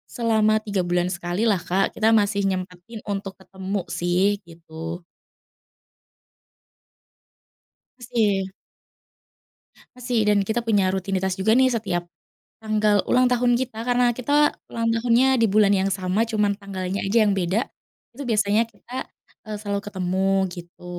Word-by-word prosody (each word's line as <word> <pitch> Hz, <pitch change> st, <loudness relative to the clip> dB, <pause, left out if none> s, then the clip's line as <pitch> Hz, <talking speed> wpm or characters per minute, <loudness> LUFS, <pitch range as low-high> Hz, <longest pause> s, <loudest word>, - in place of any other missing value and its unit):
selama 220 Hz, -2 st, +2 dB
3 205 Hz, -3 st, -2 dB
bulan 175 Hz, +1 st, 0 dB
sekali 175 Hz, +3 st, -3 dB
lah, 205 Hz, -6 st, +2 dB
Kak, 185 Hz, +3 st, 0 dB
kita 225 Hz, +1 st, +4 dB
masih 200 Hz, -1 st, +2 dB
nyempetin 185 Hz, +3 st, -5 dB
untuk 195 Hz, -2 st, -4 dB
ketemu 190 Hz, +1 st, -5 dB
sih, 180 Hz, +4 st, +1 dB
gitu. 165 Hz, +1 st, -8 dB, 3.0 s
Masih. 215 Hz, -6 st, 0 dB, 1.5 s
Masih 245 Hz, -3 st, 0 dB
dan 205 Hz, -1 st, +4 dB
kita 220 Hz, +4 st, -1 dB
punya 205 Hz, -5 st, +2 dB
rutinitas 190 Hz, 0 st, -2 dB
juga 220 Hz, +5 st, +3 dB
nih 260 Hz, 0 st, +4 dB
setiap, 190 Hz, -7 st, -2 dB, 0.6 s
tanggal 215 Hz, -2 st, +2 dB
ulang 255 Hz, 0 st, +3 dB
tahun 245 Hz, 0 st, +3 dB
kita 235 Hz, -3 st, -5 dB
karena 245 Hz, 0 st, +3 dB
kita 290 Hz, +4 st, +3 dB, 0.2 s
ulang 230 Hz, 0 st, 0 dB
tahunnya 245 Hz, +3 st, +3 dB
di 225 Hz, -, +5 dB
bulan 205 Hz, 0 st, +4 dB
yang 195 Hz, 0 st, +1 dB
sama 190 Hz, +4 st, 0 dB
cuman 210 Hz, -2 st, +1 dB
tanggalnya 195 Hz, -1 st, -4 dB
aja 225 Hz, +3 st, +3 dB
yang 205 Hz, -, +2 dB
beda, 190 Hz, +6 st, 0 dB, 0.5 s
itu 280 Hz, -, -7 dB
biasanya 215 Hz, 0 st, +2 dB
kita, 245 Hz, +3 st, -8 dB, 0.4 s
eee, 215 Hz, -1 st, -4 dB
selalu 200 Hz, -1 st, -2 dB
ketemu, 190 Hz, -1 st, -1 dB, 0.2 s
gitu. 175 Hz, 0 st, -12 dB
205 Hz, 130 wpm, -23 LUFS, 190-230 Hz, 3.0 s, di